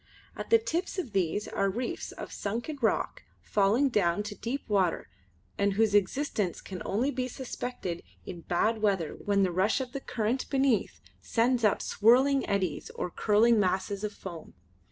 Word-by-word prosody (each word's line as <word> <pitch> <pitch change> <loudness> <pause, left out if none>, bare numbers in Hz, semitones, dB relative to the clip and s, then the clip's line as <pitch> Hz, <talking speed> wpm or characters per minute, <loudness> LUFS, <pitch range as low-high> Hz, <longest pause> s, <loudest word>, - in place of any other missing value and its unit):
At - - -6
the 460 - +7
tips 400 -5 -3
of 295 -11 -3
these 195 +2 0
are 195 0 0
reefs 235 +5 -4
of - - -8
sunken 240 +8 -4
rock 225 - 0 0.2
falling 215 +8 +3
down 200 -4 +1
to 210 0 -6
deep 255 +7 -4
water 190 - +1 0.5
and 200 0 +2
whose 215 0 +2
existence 205 - +1
can 185 -3 -8
only 240 +8 0
be 255 -2 -2
suspected 245 -8 -5 0.2
in 175 -2 -7
bad 215 +7 0
weather 190 -7 +1
when 200 -1 +1
the 185 - +1
rush 190 +8 +2
of 255 -2 -4
the 275 - -5
current 235 +2 -2
beneath 270 -5 +1 0.2
sends 240 +1 +1
up 210 - +3
swirling 260 +5 +4
eddies 190 -6 -1
or 180 - -3
curling 220 +4 +4
masses 195 +1 0
of 210 - -1
foam. 175 -5 -9
210 Hz, 165 wpm, -29 LUFS, 195-250 Hz, 0.5 s, the